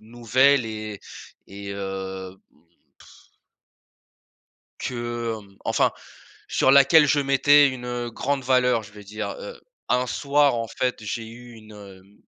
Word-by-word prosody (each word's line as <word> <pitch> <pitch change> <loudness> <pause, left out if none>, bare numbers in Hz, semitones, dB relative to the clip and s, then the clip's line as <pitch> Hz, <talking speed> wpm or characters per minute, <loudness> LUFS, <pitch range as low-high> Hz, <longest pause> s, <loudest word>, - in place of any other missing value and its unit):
nouvelle 120 +4 +2
et 110 -2 -7 0.5
et 100 0 -9
heu, 95 -1 -6 0.7
pff - - -21 1.5
que, 120 -2 -3
hem, 100 -1 -19
enfin, - - +1 0.6
sur - - +2
laquelle 140 +3 +6
je 145 - +3
mettais 140 +1 +5
une, 125 -2 -6
heu, 120 -1 -4
grande 135 +4 -2
valeur 125 -2 +2
je 100 -1 -14
veux 105 -1 -13
dire. 105 +2 -5
Heu, - - -9 0.3
un 125 0 +1
soir 140 +1 +2
en 115 -1 -3
fait 125 -1 -2
j'ai 110 +2 -4
eu 120 +2 -12
une, 110 -1 -15
hem, 100 -1 -15
120 Hz, 135 wpm, -24 LUFS, 105-130 Hz, 1.5 s, laquelle